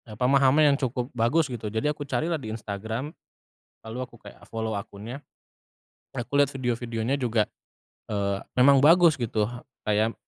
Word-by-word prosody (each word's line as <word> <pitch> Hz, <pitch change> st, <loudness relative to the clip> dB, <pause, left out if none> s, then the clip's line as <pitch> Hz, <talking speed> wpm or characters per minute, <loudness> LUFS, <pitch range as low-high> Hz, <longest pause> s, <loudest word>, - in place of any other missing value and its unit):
pemahaman 135 Hz, +4 st, +4 dB
yang -, -, +1 dB
cukup 125 Hz, -1 st, -2 dB
bagus 135 Hz, +6 st, +2 dB
gitu. 115 Hz, -3 st, -4 dB
Jadi 110 Hz, +7 st, -1 dB
aku 145 Hz, -, -5 dB
carilah 155 Hz, +6 st, -1 dB
di 110 Hz, -5 st, -6 dB
Instagram, 110 Hz, +6 st, -4 dB, 0.7 s
lalu 110 Hz, +2 st, -6 dB
aku 120 Hz, -, -18 dB
kayak -, -, -14 dB
follow 110 Hz, -1 st, -3 dB
akunnya. 105 Hz, +7 st, -7 dB, 0.9 s
Aku 130 Hz, +2 st, -4 dB
lihat 145 Hz, -1 st, +4 dB
video-videonya 120 Hz, -1 st, -2 dB
juga, 115 Hz, -5 st, +1 dB, 0.6 s
eee, 100 Hz, -2 st, -1 dB, 0.2 s
memang 135 Hz, +2 st, +6 dB
bagus 165 Hz, +2 st, +6 dB
gitu, 110 Hz, -3 st, 0 dB, 0.3 s
kayak, 110 Hz, +2 st, +1 dB
120 Hz, 140 wpm, -26 LUFS, 110-140 Hz, 0.9 s, memang